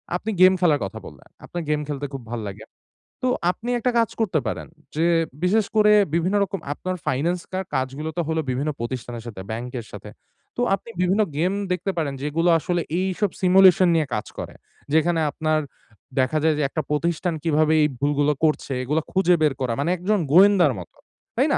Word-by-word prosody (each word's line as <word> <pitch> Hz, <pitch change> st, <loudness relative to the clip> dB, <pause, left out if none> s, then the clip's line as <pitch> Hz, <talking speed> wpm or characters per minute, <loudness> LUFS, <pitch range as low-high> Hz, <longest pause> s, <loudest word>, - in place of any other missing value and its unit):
আপনি 215 Hz, +5 st, -3 dB
গেম 185 Hz, 0 st, +8 dB
খেলার 160 Hz, -5 st, +3 dB
কথা 95 Hz, -, -7 dB
বললেন, -, -, -13 dB, 0.2 s
আপনার 175 Hz, -1 st, -5 dB
গেম 150 Hz, 0 st, +1 dB
খেলতে 145 Hz, -1 st, -4 dB
খুব 135 Hz, -, -5 dB
ভালো 115 Hz, -2 st, -3 dB
লাগে। 105 Hz, +3 st, -10 dB, 0.6 s
তো 255 Hz, -, 0 dB, 0.2 s
আপনি 230 Hz, +6 st, -7 dB
একটা 250 Hz, +2 st, +1 dB
কাজ 230 Hz, -, +2 dB
করতে 190 Hz, -8 st, +1 dB
পারেন। -, -, -4 dB, 0.3 s
যে 160 Hz, +2 st, +1 dB, 0.4 s
বিশেষ 210 Hz, +4 st, +3 dB
করে 210 Hz, -1 st, +5 dB, 0.2 s
বিভিন্ন 175 Hz, +4 st, +1 dB
রকম 195 Hz, 0 st, -4 dB
আপনার 185 Hz, +4 st, -4 dB
ফাইনান্সকার 175 Hz, +7 st, -1 dB
কাজগুলো 135 Hz, +4 st, -2 dB
তো -, -, +2 dB
হলো 160 Hz, 0 st, 0 dB
বিভিন্ন 135 Hz, +4 st, -1 dB
প্রতিষ্ঠানের 120 Hz, -1 st, -5 dB
সাথে, 105 Hz, -5 st, -7 dB
ব্যাংকের 120 Hz, +1 st, -5 dB
সাথে। 105 Hz, +1 st, -9 dB, 0.5 s
তো 245 Hz, -, 0 dB
আপনি 215 Hz, -, -14 dB
বিভিন্ন 185 Hz, +4 st, +2 dB, 0.2 s
গেম 180 Hz, +4 st, +1 dB, 0.2 s
দেখতে 180 Hz, +2 st, -1 dB
পারেন 150 Hz, -4 st, -1 dB
যেগুলো 160 Hz, +4 st, +1 dB
আসলে 175 Hz, +1 st, -1 dB, 0.2 s
এইসব 190 Hz, +2 st, 0 dB
simulation 185 Hz, -1 st, +6 dB
নিয়ে 155 Hz, -3 st, +1 dB
কাজ 105 Hz, -, -3 dB
করে। -, -, -6 dB, 0.4 s
যেখানে 165 Hz, +1 st, +3 dB
আপনার 155 Hz, 0 st, 0 dB, 0.6 s
দেখা 130 Hz, +4 st, +2 dB
যায় 160 Hz, -1 st, +3 dB
যে 150 Hz, -, 0 dB
একটা 155 Hz, -, -2 dB
প্রতিষ্ঠান 170 Hz, +3 st, 0 dB
কিভাবে 155 Hz, -1 st, +2 dB
এই 150 Hz, -, +4 dB
ভুলগুলো 145 Hz, +1 st, +2 dB
করছে, 150 Hz, -3 st, 0 dB
এগুলো 150 Hz, +5 st, 0 dB
খুঁজে 180 Hz, -2 st, +3 dB
বের 150 Hz, -3 st, +3 dB
করা। 120 Hz, -3 st, 0 dB
মানে 145 Hz, +4 st, 0 dB
একজন 200 Hz, +4 st, 0 dB
গোয়েন্দার 185 Hz, -3 st, +6 dB
মতো, 90 Hz, -, -12 dB, 0.4 s
তাই -, -, +3 dB
না? -, -, +3 dB
160 Hz, 185 wpm, -23 LUFS, 145-185 Hz, 0.6 s, গেম